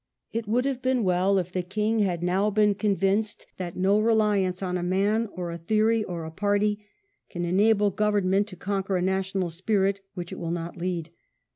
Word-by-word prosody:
It 230 Hz, -1 st, -3 dB
would 245 Hz, +4 st, +1 dB
have 270 Hz, -2 st, -1 dB
been 255 Hz, -2 st, +1 dB
well 185 Hz, +1 st, +2 dB
if 180 Hz, -1 st, -2 dB
the 185 Hz, -, -1 dB
king 210 Hz, +5 st, -1 dB
had 180 Hz, -5 st, 0 dB
now 190 Hz, +4 st, +2 dB
been 210 Hz, 0 st, +3 dB
convinced 200 Hz, +1 st, 0 dB
that 175 Hz, -2 st, -5 dB
no 195 Hz, +3 st, +3 dB
reliance 210 Hz, -4 st, +2 dB
on 180 Hz, -1 st, -2 dB
a 180 Hz, -, -1 dB
man, 200 Hz, +5 st, +1 dB
or 175 Hz, -2 st, -4 dB
a 170 Hz, -, -6 dB
theory, 220 Hz, +5 st, +2 dB
or 170 Hz, -4 st, -5 dB
a 160 Hz, -, -7 dB
party 205 Hz, +3 st, 0 dB, 0.5 s
can 175 Hz, 0 st, -3 dB
enable 205 Hz, +3 st, +3 dB
government 205 Hz, -1 st, +1 dB
to 195 Hz, -, -9 dB
conquer 195 Hz, +1 st, -2 dB
a -, -, -1 dB
national 190 Hz, -1 st, -1 dB
spirit 195 Hz, +2 st, 0 dB
which 175 Hz, -1 st, -6 dB
it -, -, -6 dB
will 170 Hz, -, -4 dB
not 170 Hz, 0 st, -4 dB
lead. 170 Hz, -2 st, -3 dB
195 Hz, 190 wpm, -26 LUFS, 180-210 Hz, 0.5 s, been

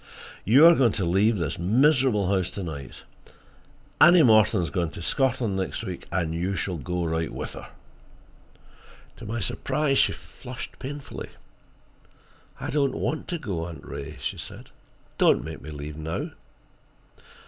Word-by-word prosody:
You 130 Hz, -, +7 dB
are 170 Hz, -, +10 dB
going 125 Hz, -8 st, +3 dB
to 95 Hz, -, -1 dB
leave 100 Hz, +6 st, +3 dB
this 85 Hz, -4 st, -3 dB
miserable 125 Hz, -, +3 dB
house 95 Hz, -2 st, +1 dB
to 100 Hz, -, -3 dB
night. 70 Hz, -6 st, -7 dB, 1.0 s
Annie 175 Hz, 0 st, +8 dB
Morton 110 Hz, -3 st, +5 dB
is 80 Hz, -, -4 dB
going 85 Hz, +1 st, -1 dB
to -, -, -6 dB
Scotland 125 Hz, -, +1 dB
next 95 Hz, +5 st, -3 dB
week, 95 Hz, -5 st, -6 dB
and 85 Hz, -3 st, -1 dB
you 90 Hz, +4 st, -1 dB
shall 90 Hz, -2 st, -2 dB
go 85 Hz, +5 st, -3 dB
right 80 Hz, 0 st, -1 dB
with -, -, -5 dB
her." -, -, -10 dB, 1.5 s
To 115 Hz, -, -9 dB
my 115 Hz, +2 st, -3 dB
surprise, 135 Hz, +7 st, 0 dB
she -, -, +4 dB
flushed 125 Hz, -1 st, -10 dB
painfully. 140 Hz, +1 st, -7 dB, 1.3 s
"I -, -, -4 dB
don't 140 Hz, -2 st, +1 dB
want 155 Hz, -, -2 dB
to 175 Hz, -, -2 dB
go, 90 Hz, -, -4 dB
Aunt 85 Hz, -, -10 dB
Ray," 70 Hz, +1 st, -7 dB
she -, -, -4 dB
said. -, -, -10 dB, 0.5 s
"Don't -, -, +4 dB
make -, -, -7 dB
me 75 Hz, -, -9 dB
leave 75 Hz, 0 st, -7 dB
now." 80 Hz, +1 st, -4 dB
100 Hz, 155 wpm, -26 LUFS, 85-130 Hz, 1.5 s, are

